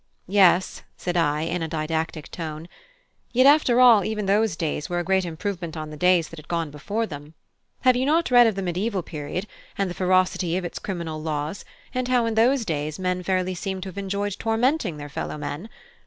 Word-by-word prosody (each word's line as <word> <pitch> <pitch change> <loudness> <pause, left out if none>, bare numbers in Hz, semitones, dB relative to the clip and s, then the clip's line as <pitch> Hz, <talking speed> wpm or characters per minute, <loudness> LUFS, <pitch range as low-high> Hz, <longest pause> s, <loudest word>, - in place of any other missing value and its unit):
"Yes," 185 -1 +3 0.2
said 175 -1 -3
I, 150 -3 +2
in 165 +2 -2
a 165 - -1
didactic 160 0 -3
tone; 160 -1 -6 0.7
"yet 255 +2 +5
after 280 -4 +5
all, 235 -5 +7
even 215 +1 -2
those 205 -1 +2
days 160 -1 -3
were 175 - -1
a 175 - 0
great 190 +1 +1
improvement 170 0 -4
on 155 -1 -5
the - - -7
days 180 0 +3
that 165 - -10
had 155 - -15
gone 165 -3 -2
before 205 +10 -2
them. 150 -3 -9 0.5
Have 255 -1 +5
you 255 +2 0
not 325 -1 +2
read 245 -1 +7
of 220 - 0
the 195 - -3
Mediaeval 185 +2 -1
period, 155 +4 -5 0.3
and 195 -2 0
the - - -4
ferocity 185 -1 +1
of 185 - -3
its 175 - -5
criminal 170 -5 -4
laws; 155 +3 -3 0.3
and 255 0 -1
how 250 -2 +2
in 230 - -1
those 235 +3 +3
days 150 -3 -2
men 180 -1 -1
fairly 185 0 0
seemed 190 +1 -4
to 195 - -5
have 185 - -12
enjoyed 200 0 -2
tormenting 225 - +1
their 145 0 -7
fellow 145 +1 -5
men? 160 +7 -5
180 Hz, 205 wpm, -24 LUFS, 160-215 Hz, 0.7 s, all